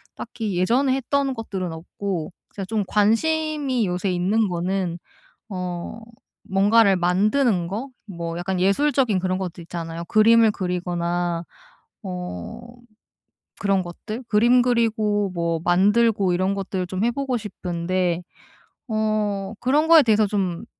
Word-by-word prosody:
딱히 215 -5 -5
예전에 250 +9 +2
했던 275 +1 0
것들은 190 -7 -4
없고 175 +1 -5 0.2
제가 195 -2 -4
좀 215 -1 -1
관심이 275 +4 +1
요새 180 +2 -1
있는 195 +5 +1
거는 180 0 -2 0.5
어 180 +2 -5 0.5
뭔가를 200 +1 +4
만드는 190 +2 +2
거 220 +8 -4 0.2
뭐 170 -4 -5
약간 180 +1 -2
예술적인 240 +2 +2
그런 185 0 -1
것들 180 -2 -5
있잖아요. 165 0 -6
그림을 220 +2 +5
그리거나 175 -2 -2 0.6
어 180 - -6 1.0
그런 195 -2 +1
것들 215 +8 -7
그림 240 +4 +5
그리고 220 -4 +1
뭐 170 -1 -1
만들고 200 +2 +3
이런 185 +2 0
것들을 190 -2 -3
좀 185 +2 -3
해 240 - +2
보고 260 -1 -2
싶은데 180 -3 -2 0.7
어 215 -2 -1
그런 295 +5 +2
거에 330 -2 +8
대해서 215 -3 +3
좀 190 -4 -2
195 Hz, 255 characters per minute, -23 LUFS, 180-225 Hz, 1.0 s, 거에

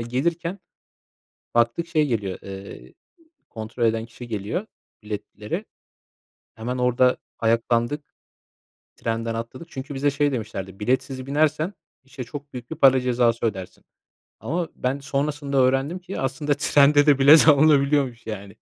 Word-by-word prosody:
gelirken, 165 +10 -2 1.0
baktık 120 +8 +2
şey, 160 -2 +2
eee, 150 - 0
geliyor, 100 -6 -2
eee, 95 -10 -10 0.6
kontrol 115 +2 -3
eden 115 0 +1
kişi 120 +1 -11
geliyor 110 - -3 0.4
biletleri. 105 0 -5 0.9
Hemen 120 +3 -4
orada 125 0 +3 0.2
ayaklandık, 115 +5 +1 0.9
trenden 115 0 -2
atladık. 115 +8 -6
Çünkü 135 +1 -7
bize 145 +2 +1
şey 145 0 +1
demişlerdi: 95 -5 -5
"Biletsiz 130 +3 -1
binersen, 155 +5 +1 0.3
işte 130 -1 -8
çok 145 +3 -9
büyük 125 -1 -8
bir 160 - -5
para 135 -1 +6
cezası 120 -2 +1
ödersin." 95 -4 -5 0.6
Ama 170 +3 -2
ben 130 +2 -2
sonrasında 140 0 -2
öğrendim 135 +6 +2
ki, 180 +1 -6
aslında 145 +2 0
trende 145 0 +4
de 145 -2 +5
bilet 150 +4 +8
alınabiliyormuş, 140 -5 +4
yani. 100 -2 -7
130 Hz, 130 wpm, -23 LUFS, 115-145 Hz, 1.0 s, bilet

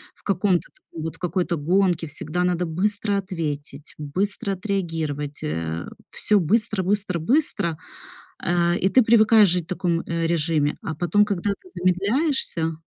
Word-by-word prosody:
в - - -27
каком-то 190 -2 +1
таком 160 -2 -10
вот, 160 - -4
в - - -21
какой-то 175 -1 -1
гонке 175 +2 +1
всегда 155 +4 -3
надо 180 0 +1
быстро 205 +4 0
ответить, 150 -6 -5
быстро 195 +6 -2
отреагировать, 165 -7 -3
э. 80 +1 -3 0.3
Всё 210 -1 +2
быстро, 210 +3 +1
быстро, 195 -2 0
быстро, 200 - +1 0.6
а, 175 0 +1
и 190 +2 +1
ты 255 - +5
привыкаешь 220 -2 +6
жить 180 0 +1
в - - -37
таком, 175 -2 -1
э, 165 -1 -2
режиме. 155 -3 +1
А 160 - -4
потом, 175 +6 +3
когда 200 -1 -1
ты 285 - -8
замедляешься, 185 - +1
180 Hz, 150 wpm, -23 LUFS, 160-200 Hz, 0.6 s, привыкаешь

